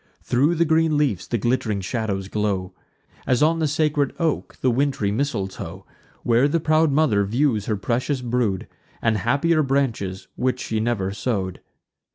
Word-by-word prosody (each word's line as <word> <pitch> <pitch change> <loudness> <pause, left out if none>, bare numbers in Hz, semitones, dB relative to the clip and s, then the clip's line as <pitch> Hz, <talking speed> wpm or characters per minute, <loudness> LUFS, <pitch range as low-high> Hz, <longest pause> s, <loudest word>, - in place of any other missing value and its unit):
Thro' 145 +7 +2
the 170 +1 +2
green 160 -1 +2
leafs 125 - 0
the 120 - 0
glitt'ring 115 -2 0
shadows 100 -1 -2
glow; 100 -3 -2 0.5
As, 125 +2 +3
on 165 +2 +3
the 160 - +2
sacred 150 -2 0
oak, 165 -3 -1
the 130 - +3
wintry 130 -5 0
mistletoe, 100 - -3 0.4
Where 120 +3 +4
the 165 +3 +1
proud 155 0 +3
mother 135 -9 +3
views 115 0 0
her 110 - 0
precious 125 +6 -1
brood, 120 -6 -1 0.3
And 115 -2 +1
happier 145 - +2
branches, 115 -9 -1
which 125 0 0
she 110 -3 -2
never 110 -4 -1
sow'd. 95 -3 -2
120 Hz, 155 wpm, -23 LUFS, 100-145 Hz, 0.5 s, Where